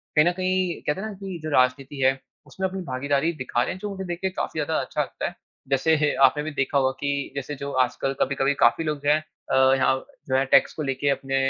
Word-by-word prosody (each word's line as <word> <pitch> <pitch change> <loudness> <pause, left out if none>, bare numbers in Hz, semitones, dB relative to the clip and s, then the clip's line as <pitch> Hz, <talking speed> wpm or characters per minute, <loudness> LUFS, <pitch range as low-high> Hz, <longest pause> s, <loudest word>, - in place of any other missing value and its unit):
कहीं 150 0 +6
न 175 - +4
कहीं 185 -1 0
कहते 150 +6 -2
है - - -4
ना 215 - -6
कि 190 -3 -7
जो 155 - -3
राजनीति 135 +1 +1
है 135 0 +3 0.3
उसमें 190 0 -2
अपनी 190 0 -5
भागीदारी 140 +5 0
दिखा 130 -4 -1
रहे - - -2
हैं 185 - -10
जो 210 - -4
मुझे 195 -1 -5
देख 175 0 -4
के 190 - +1
काफ़ी 170 -3 -4
ज़्यादा 155 +2 0
अच्छा - - -2
लगता - - -4
है। - - -7 0.3
जैसे 150 +2 +2
आपने 150 +3 +4
भी 155 - -4
देखा 140 -1 0
होगा 130 -1 +3
कि 140 -1 -2
जैसे 140 +2 -4
जो 140 +1 -5
आजकल 130 +2 -2
कभी-कभी 140 0 +2
काफ़ी 165 - +4
लोग 150 -2 -2
जो 145 - +2
है 150 - +5 0.3
अ, - - +3 0.2
यहाँ 130 0 +3 0.3
जो 130 - 0
है 135 +1 +3
टैक्स - - +4
को 155 - -4
लेके 135 +1 -1
अपने 135 -1 -1
145 Hz, 245 wpm, -24 LUFS, 135-170 Hz, 0.3 s, कहीं